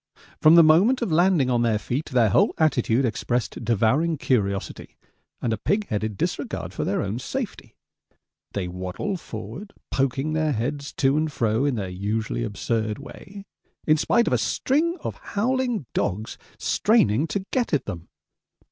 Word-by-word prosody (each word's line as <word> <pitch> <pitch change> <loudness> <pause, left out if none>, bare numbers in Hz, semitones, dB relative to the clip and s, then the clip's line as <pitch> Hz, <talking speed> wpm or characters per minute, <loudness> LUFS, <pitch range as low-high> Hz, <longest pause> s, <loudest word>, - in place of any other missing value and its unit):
From 155 +2 +7
the 170 - +9
moment 195 +12 +4
of 195 - -2
landing 165 -5 +3
on 120 -1 +2
their 115 -2 +2
feet 125 +9 -3
their 120 -5 +3
whole - - +3
attitude 130 -5 +2
expressed 120 +1 -2
devouring 120 - +2
curiosity 100 -8 -2 0.5
and 115 - +1
a 110 - -3
pig 205 - 0
headed 105 -1 -2
disregard - - -3
for - - -3
their - - 0
own 100 +4 -3
safety. 245 - -5 0.8
They 95 -3 -2
waddle 90 - -4
forward, 200 +3 -8 0.2
poking 135 +3 0
their 155 -1 +1
heads 140 +5 -3
to 135 +1 +2
and 155 0 0
fro 115 0 +1
in 140 -3 +1
their 100 -4 -3
usually 95 - -2
absurd 110 - -2
way, 190 +8 -11 0.4
in 155 0 +4
spite 235 +9 +2
of - - 0
a 125 - +3
string 300 - 0
of - - -5
howling 245 - -1
dogs 105 +3 -2 0.2
straining 160 - +2
to 190 +5 -3
get 250 -2 0
at 145 - +1
them. 85 -1 -7
135 Hz, 160 wpm, -24 LUFS, 110-170 Hz, 0.8 s, the